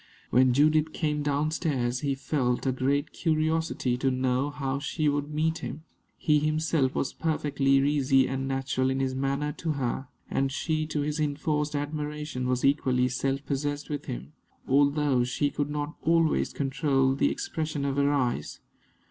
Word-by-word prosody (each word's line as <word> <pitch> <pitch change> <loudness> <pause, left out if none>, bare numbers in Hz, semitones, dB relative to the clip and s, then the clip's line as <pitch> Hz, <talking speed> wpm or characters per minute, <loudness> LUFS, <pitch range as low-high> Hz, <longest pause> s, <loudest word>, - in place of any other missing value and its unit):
When 130 +1 +5
Judith 155 +4 +3
came 150 -2 -1
down 145 +1 0
stairs, 130 -7 -1
he 140 -1 -1
felt 130 -3 -1
a 135 - +2
great 140 +3 0
curiosity 155 -5 0
to 135 +1 +1
know 130 +1 0
how 140 -2 -3
she 150 +2 -1
would 145 0 0
meet 160 +2 0
him. 155 - -6 0.3
He 150 -2 +3
himself 155 -2 +1
was 135 - -1
perfectly 145 -4 -1
easy 135 -1 +3
and 135 0 -2
natural 135 -1 0
in 135 0 0
his 135 -1 0
manner 140 +2 -1
to 160 +2 -3
her; 135 -1 -2 0.2
and 135 0 0
she, 155 +1 -1
to 150 -1 -2
his 150 +1 -2
enforced 150 0 -1
admiration, 150 -2 -3
was 125 0 +1
equally 130 -3 +2
self 135 +2 -1
possessed 145 +1 -2
with 145 - -3
him, 65 +4 -6 0.3
although 140 -1 +3
she 140 +4 0
could 145 0 -2
not 150 +1 -3
always 165 0 +2
control 135 -1 +1
the 135 - +2
expression 155 -3 -3
of 140 0 -1
her 140 0 +3
eyes. 125 - -1
145 Hz, 165 wpm, -27 LUFS, 135-150 Hz, 0.3 s, When